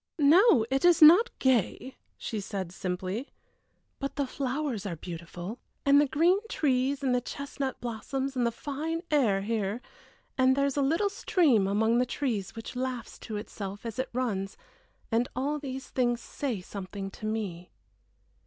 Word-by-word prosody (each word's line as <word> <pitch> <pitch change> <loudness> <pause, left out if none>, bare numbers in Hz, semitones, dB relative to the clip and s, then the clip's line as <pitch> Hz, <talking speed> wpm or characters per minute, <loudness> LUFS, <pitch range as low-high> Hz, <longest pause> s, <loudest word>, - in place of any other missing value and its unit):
"No, 310 - +6
it 270 0 +1
is 350 -2 +6
not 350 +10 +8
gay," 260 0 +1 0.2
she 220 - -4
said, 190 -3 -4
simply. 185 - -4 0.7
"But 275 -1 -4
the 285 - 0
flowers 265 -4 -2
are 175 - -3
beautiful, 175 +5 -7 0.3
and 280 +1 +6
the 295 - +2
green 335 +7 +3
trees 275 - +1
and 260 -2 +2
the 250 - +2
chestnut 275 0 -5
blossoms 265 +4 -3
and 250 - +1
the 235 - +2
fine 310 +7 -4
air 225 -10 +3
here, 215 0 -1 0.6
and 260 0 +5
there 280 0 +2
is 280 - -1
a 285 - +1
little 330 +9 +2
stream 300 - +3
among 220 +4 +2
the 250 - +2
trees 235 -8 -2
which 225 +2 -7
laughs 255 -1 -4
to 215 -2 -5
itself 205 -1 -7
as 230 +2 -5
it 260 - -1
runs, 210 -6 -2 0.5
and 235 +2 +1
all 285 +4 -1
these 270 -1 -6
things 240 -2 +1
say 245 -5 -4
something 195 +1 -6
to 215 - -6
me." 195 -6 -4
250 Hz, 160 wpm, -29 LUFS, 210-280 Hz, 0.7 s, not